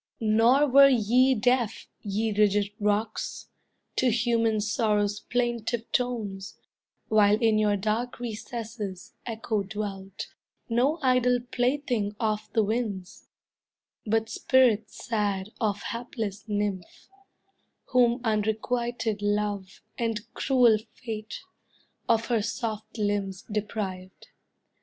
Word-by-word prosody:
Nor 230 +6 +4
were 275 +1 +8
ye 255 +2 +4
deaf, 240 -1 +1
ye 210 +2 -1
rigid 205 -1 +3
rocks, 210 +1 -1 0.5
To 255 - +3
human 230 -1 +2
sorrow's 210 -1 +1
plaintive 240 -1 -2
tones, 215 -6 -2 0.5
While 210 -1 +5
in 220 -2 +3
your 210 -1 +2
dark 220 +5 -2
recesses 225 -4 -6
Echo 220 -2 -1
dwelt, 195 -1 -6 0.4
No 250 +7 +2
idle 250 -1 +4
plaything 245 -5 0
of 215 -1 -1
the 220 - +3
winds, 210 -4 -3 0.8
But 220 +1 +1
spirit 225 -2 +3
sad 205 -3 -2
of 205 -2 0
hapless 225 -4 -5
nymph, 205 -4 -3 0.8
Whom 245 -1 +3
unrequited 220 0 -1
love, 205 -2 -2 0.2
and 230 -2 0
cruel 245 -5 +4 0.2
fate, 220 -3 -6 0.7
Of 230 -1 +3
her 230 -3 +1
soft 220 +1 -4
limbs 205 -2 -1
deprived. 195 -3 -4
220 Hz, 100 wpm, -27 LUFS, 205-240 Hz, 0.8 s, were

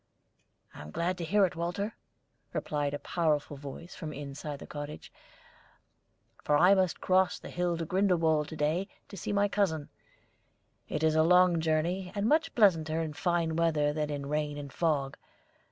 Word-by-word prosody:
"I - - -10
am 75 - -9
glad 175 - -2
to - - -3
hear 200 +4 +4
it, 180 - -4
Walter," 175 +6 -3 0.6
replied 145 -1 -1
a - - -2
powerful 150 -3 -1
voice 145 +5 -9
from 155 -3 -6
inside 145 +1 -6
the - - -10
cottage, 145 0 -8 1.3
"for 150 - +3
I 180 +5 +6
must 185 -3 +1
cross 185 0 +3
the - - -10
hill 175 -1 0
to 165 - -3
Grindelwald 165 -5 +2
to - - -7
day 160 +6 0 0.2
to - - -9
see 195 - -4
my 205 0 +3
cousin. 180 -8 0 1.0
It 150 - -2
is 160 -1 +4
a 160 - +4
long 180 +1 +5
journey, 170 +4 0
and 205 +1 0
much 310 +5 +2
pleasanter 165 -8 +3
in 160 -2 -3
fine 170 -1 0
weather 155 -3 +2
than 150 -1 -2
in 145 -1 -4
rain 150 0 -2
and 140 -2 -7
fog. 145 -5 0
160 Hz, 170 wpm, -30 LUFS, 150-180 Hz, 1.3 s, I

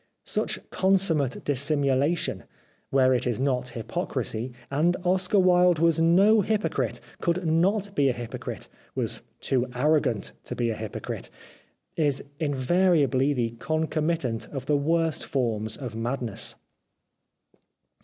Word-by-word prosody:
Such - - -1
consummate 180 -8 +1
dis 140 -3 +1
simulation, 145 +2 +1 0.4
where 130 -1 +4
it 125 - 0
is 120 -1 -1
not 125 -2 -1
hypocrisy 115 +2 -3
— 120 - -25
and 165 +5 +2
Oscar 185 +2 +2
Wilde 180 -2 +5
was 165 0 +3
no 195 +6 +5
hypocrite, 215 +2 -1 0.2
could 175 +1 0
not 195 +5 +1
be 140 -1 +3
a - - +1
hypo 120 -1 -6
crite, - - -5 0.3
was - - -1 0.2
too 125 -2 0
arrogant 130 -6 +1
to - - -5
be 120 -1 0
a - - -3
hypocrite 110 -2 -5 0.3
— - - -42
is 145 -4 +1 0.2
in 145 -3 0
variably 145 -2 +3
the 120 -5 0
concomitant 155 -5 -1
of 135 -3 -6
the 150 - +2
worst 160 +2 +1
forms 110 -5 -1
of 125 -4 -6
madness. 120 -1 -3
145 Hz, 135 wpm, -26 LUFS, 125-170 Hz, 0.4 s, Wilde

